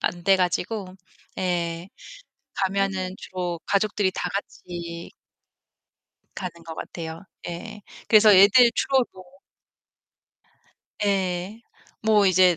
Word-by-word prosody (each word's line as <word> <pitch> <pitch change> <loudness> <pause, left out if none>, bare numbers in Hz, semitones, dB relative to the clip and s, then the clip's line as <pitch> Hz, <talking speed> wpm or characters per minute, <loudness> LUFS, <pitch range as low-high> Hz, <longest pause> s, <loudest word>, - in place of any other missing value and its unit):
안 175 0 -2
돼 195 0 +6
가지고. 185 +1 -2 0.4
예. 170 -1 -2 0.7
가면은 190 -1 -1
주로 180 -2 -4
가족들이 200 -1 +1
다 180 -1 -3
같이 170 -3 -6 1.2
가는 170 -2 -6
것 165 -1 -7
같아요. 165 +1 -7 0.2
예. 210 +5 -7 0.3
그래서 215 -1 +7
애들 205 +6 +7
주로 265 -2 +2
뭐 185 - -12 1.8
예. 190 +1 -1 0.4
뭐 215 -2 +4
이제 185 -2 +5
185 Hz, 175 characters per minute, -24 LUFS, 175-200 Hz, 1.8 s, 그래서